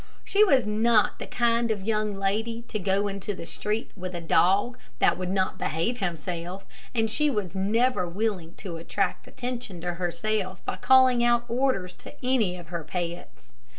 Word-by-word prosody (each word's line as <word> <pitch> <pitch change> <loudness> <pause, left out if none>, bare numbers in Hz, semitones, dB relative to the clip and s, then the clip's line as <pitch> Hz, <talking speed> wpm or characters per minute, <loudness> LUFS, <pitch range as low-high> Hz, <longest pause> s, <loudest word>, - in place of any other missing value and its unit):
She 410 +1 +4
was 275 - +4
not 215 +1 +3
the - - -5
kind 235 -1 +1
of 210 -3 -1
a - - -9
young 215 -2 0
lady 220 +4 -1
to 215 - -2
go 195 +1 +1
into 200 0 -4
the 170 - -7
street 210 +6 -3
with 185 -2 -6
a - - -2
dog 195 +8 +2 0.2
that - - +4
would 185 -1 -4
not 190 0 0
behave 225 +11 -1
himself, 175 +1 -4 0.3
and 225 -1 +3
she 300 +7 +1
was 210 - -2
never 205 0 +1
willing 185 -3 -2
to 180 -5 -6
attract 165 - -2
attention 245 -7 -5
to 175 0 -2
herself 185 +2 -2
by - - -2
calling 260 -2 +5
out 240 0 +3
orders 235 -8 0
to - - -11
any 225 -9 +2
of 170 -2 -11
her 170 -2 -4
pets. 165 -8 -6
200 Hz, 180 wpm, -27 LUFS, 180-235 Hz, 0.3 s, calling